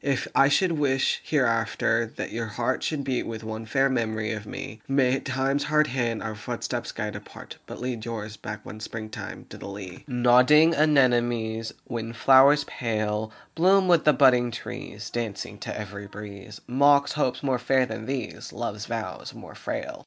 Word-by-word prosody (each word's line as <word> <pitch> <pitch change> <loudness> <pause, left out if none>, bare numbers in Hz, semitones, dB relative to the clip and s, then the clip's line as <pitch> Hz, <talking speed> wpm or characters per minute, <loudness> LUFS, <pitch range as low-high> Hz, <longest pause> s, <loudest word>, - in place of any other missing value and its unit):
If 140 -1 0
I 135 - +6
should 185 +5 +3
wish 140 -4 +1
hereafter 115 -3 +1
that - - -4
your 115 0 -3
heart 115 +2 -1
Should 150 -3 -2
beat 130 -2 -1
with 115 -1 -6
one 110 0 -6
fair 135 +3 +3
memory 110 -4 -1
of 105 -1 -5
me, 110 0 -7
May 135 -1 +2
Time's 135 +1 -1
hard 155 0 +3
hand 120 -5 -2
our 110 - -3
footsteps 105 - -4
guide - - -4
apart, - - -10
But - - -8
lead 125 -3 -4
yours 110 -2 -5
back 105 -2 -8
one 110 - -8
spring 110 0 -6
time - - -7
to - - -9
the - - -8
Lea. 100 -2 -8
Nodding 125 +6 +5
Anemones, 120 -7 +2
Wind 115 0 -5
flowers 135 +3 +6
pale, 110 -4 -2 0.2
Bloom 185 +3 +4
with 170 -3 +5
the 150 - +6
budding 125 -4 +5
trees, 115 - -7
Dancing 115 -4 -4
to - - -5
every 100 -1 -7
breeze, 105 0 -10
Mock 140 +2 +4
hopes 145 -4 -1
more 130 -3 +1
fair 130 +1 +2
than 110 -3 -6
these, 130 -4 -4
Love's - - -5
vows - - -5
more - - -11
frail. - - -5
120 Hz, 175 wpm, -26 LUFS, 110-135 Hz, 0.2 s, I